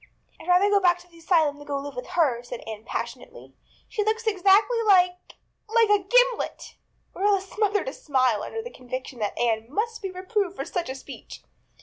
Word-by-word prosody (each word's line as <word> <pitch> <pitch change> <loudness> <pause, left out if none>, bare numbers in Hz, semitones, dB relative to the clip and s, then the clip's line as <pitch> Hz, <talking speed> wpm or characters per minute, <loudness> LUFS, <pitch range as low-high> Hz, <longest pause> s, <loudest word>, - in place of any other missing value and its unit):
"I'd - - -12
rather 360 +3 +5
go 410 0 +4
back 355 -2 +4
to 355 - -19
the 335 -1 -18
asylum 320 -4 +2
than 290 - -12
go 280 - -1
to - - -7
live 285 - -7
with 250 - -6
her," 265 -8 +3
said 245 -1 -8
Anne 220 -1 -8
passionately. - - -7 0.3
"She 425 - -2
looks 445 +2 -1
exactly 415 +3 +4
like 360 -4 +3
a 430 - -28
like 455 -2 +5
a 410 -2 +4
gimlet." - - +1 0.4
Marilla 400 0 +2
smothered 410 +3 -1
a - - -3
smile 255 - +1
under 450 - -5
the 485 - -8
conviction 255 0 -7
that 210 -1 -2
Anne 225 0 0
must 450 +7 -2
be 390 - -3
reproved 375 +1 -2
for - - -4
such 345 -6 -3
a 260 - -4
speech. 270 - -11
365 Hz, 205 wpm, -25 LUFS, 275-420 Hz, 0.4 s, rather